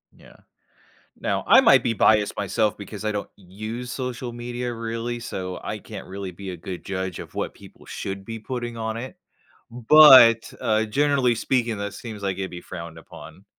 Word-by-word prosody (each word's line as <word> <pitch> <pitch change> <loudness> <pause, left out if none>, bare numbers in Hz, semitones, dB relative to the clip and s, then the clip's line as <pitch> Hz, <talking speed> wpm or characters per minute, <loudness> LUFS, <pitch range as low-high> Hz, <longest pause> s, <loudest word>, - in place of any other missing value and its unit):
Yeah. - - -18 0.8
Now, - - -2
I - - +8
might 135 - +6
be 120 - 0
biased 105 -1 +3
myself 110 -3 0
because 105 0 -9
I 110 - 0
don't 105 -1 -4
use 110 +6 -7
social 125 -1 -5
media 120 +1 -5
really, 115 +1 -4
so 95 -5 -5
I - - -4
can't - - -10
really 95 0 -6
be 95 +2 -8
a 90 - -6
good 90 +2 -8
judge 95 -2 -4
of - - -10
what - - -3
people - - -16
should 95 0 -6
be 115 +2 -6
putting 120 +1 -5
on 110 -1 -3
it, 130 +3 -8 0.5
but, 120 -2 +7
uh, 110 0 +1
generally 135 +1 +2
speaking, 115 -1 -1
that 100 0 -5
seems 110 -4 -8
like 95 -2 -2
it'd 95 -1 -4
be 90 - -8
frowned 85 -1 -9
upon. 80 - -13
110 Hz, 180 wpm, -24 LUFS, 100-120 Hz, 0.8 s, I